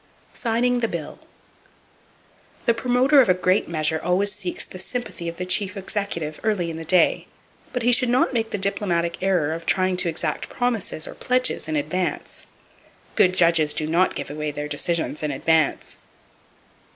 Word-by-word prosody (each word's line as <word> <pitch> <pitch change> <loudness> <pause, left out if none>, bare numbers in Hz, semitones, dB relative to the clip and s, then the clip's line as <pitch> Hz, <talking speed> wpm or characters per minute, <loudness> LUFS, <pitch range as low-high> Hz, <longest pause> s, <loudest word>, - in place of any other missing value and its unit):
Signing 245 +1 +1
The 230 - +1
Bill. 170 -7 -6 1.5
—The 235 - +4
promoter 255 +4 +4
of 240 - +2
a 185 - +5
great 185 +1 +1
measure 160 -1 0
always 195 +3 +1
seeks 190 -3 -3
the 185 - -10
sympathy 215 -4 -4
of 170 - -9
the 180 - -3
Chief 190 +2 +1
Executive 190 -6 -3
early 190 -6 0
in 160 - -6
the 165 - -6
day; 175 +2 +3 0.4
but 250 -2 -2
he 245 - +4
should 250 0 +3
not 250 +2 +2
make 225 -2 0
the - - -2
diplomatic 175 -4 0
error 180 -5 +1
of 165 +1 -7
trying 185 -1 +2
to 180 -1 +1
exact 160 -2 -2
promises 230 -10 -1
or - - -7
pledges 255 -6 0
in 155 - -2
advance. 165 +5 -2 0.7
Good 185 0 +4
judges 165 -4 +3
do 155 - 0
not 170 +4 +2
give - - -5
away 150 0 -3
their 150 0 -4
decisions 155 +1 -1
in 150 - -1
advance. 155 +2 +1
180 Hz, 170 wpm, -23 LUFS, 160-220 Hz, 1.5 s, a